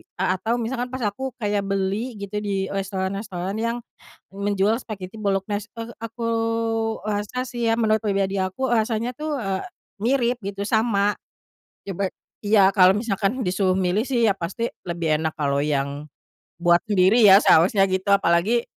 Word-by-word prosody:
a 185 0 0
atau 230 +2 0
misalkan 245 +1 -2
pas 255 -1 -5
aku 250 +6 -3
kayak 205 -4 -1
beli 200 +5 -1
gitu 200 +1 -4
di 195 -2 -2
restoran-restoran 195 0 -3
yang 230 +1 -1 0.6
menjual 200 +1 +1
spaghetti 195 -3 -8
bolognese, 205 +2 -1
eee, 230 +1 -6
aku 230 +1 -6 0.8
rasa 215 +5 -2
sih 240 -2 -1
ya, 225 - +1
menurut 220 -1 +2
pribadi 195 -2 0
aku 185 +8 -2
rasanya 230 +2 0
tuh, 300 +1 -3
eee, 195 -5 -2 0.4
mirip 245 0 +2
gitu 200 +1 -4
sama, 210 -2 +2 0.7
ya 195 - -5
be 190 +1 -1 0.3
iya 200 -2 +4
kalau 185 -2 +7
misalkan 215 +2 -1
disuruh 185 0 +1
milih 185 +3 +1
sih, 240 -3 +1
iya 200 - +3
pasti 195 +6 -3 0.2
lebih 170 -3 -1
enak 160 0 0
kalau 140 -1 +1
yang 145 0 -2 0.5
buat 175 0 +4
sendiri 200 +2 +4
ya 190 - +9
seharusnya 195 +5 +5
gitu, 190 0 -1
apalagi 200 +6 +2
200 Hz, 155 wpm, -23 LUFS, 190-230 Hz, 0.8 s, ya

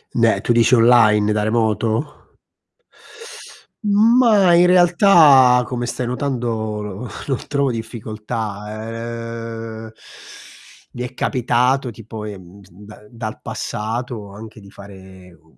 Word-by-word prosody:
Né, 115 -4 +2
tu 120 - +1
dici 120 +2 +4
online, 115 -3 +4
da 105 0 0
remoto? 110 +3 0 1.8
Ma, 210 -2 +4
in 175 +1 +5
realtà, 170 -8 +5
come 120 -2 -4
stai 125 +1 -4
notando, 120 -5 -3 0.2
no 125 - -7 0.2
non 135 -3 -3
trovo 140 -1 0
difficoltà, 115 0 -6
ehm, - - -17 1.0
mi 120 - -7
è 125 - -7
capitato, 125 0 0
tipo, 110 -1 -10
ehm, 100 -2 -10
da 105 +3 -15
dal 115 -2 -7
passato, 110 -1 -5
anche 110 +1 -12
di 100 - -15
fare, 95 -2 -14
uhm, 80 -5 -26
115 Hz, 110 wpm, -19 LUFS, 105-125 Hz, 1.8 s, in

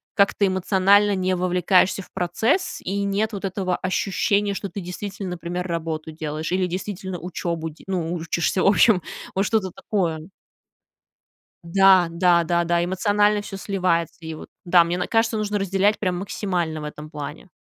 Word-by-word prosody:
как-то 200 0 +3
эмоционально 195 +2 +3
не 185 0 0
вовлекаешься 180 +1 +2
в - - -21
процесс, 220 - 0
и 200 +2 -2
нет 205 +3 0
вот 200 -1 -4
этого 185 -1 -1
ощущения, 200 +2 0
что 200 0 -5
ты, 200 - -6
действительно, 190 +1 -6
например, 175 +1 -4
работу 160 -2 -3
делаешь 155 0 -4
или, 185 0 +1
действительно, 190 0 -5
учебу 170 -1 -4
де 155 - -18
ну, 175 -3 -2
учишься, 170 +2 -1
в - - +3
общем, 200 -1 +5 0.3
вот 195 - +1
что-то 210 -5 0
такое. 170 -5 -2 1.4
Да 190 -1 +5
да 170 0 +3
да 170 +1 +1
да, 170 0 +1
эмоционально 205 +3 +2
всё 205 -1 -8
сливается, 185 -4 -1
и 160 - -5
вот, 155 - -10 0.2
да, 175 -1 +6
мне 170 +1 -2
н 180 - -2
кажется, 225 -1 +1
нужно 210 -1 -1
разделять 195 +2 +2
прям 185 -3 -1
максимально 175 -5 -2
в - - -7
этом 150 0 -8
плане. 150 +3 -7
185 Hz, 165 wpm, -23 LUFS, 170-200 Hz, 1.4 s, да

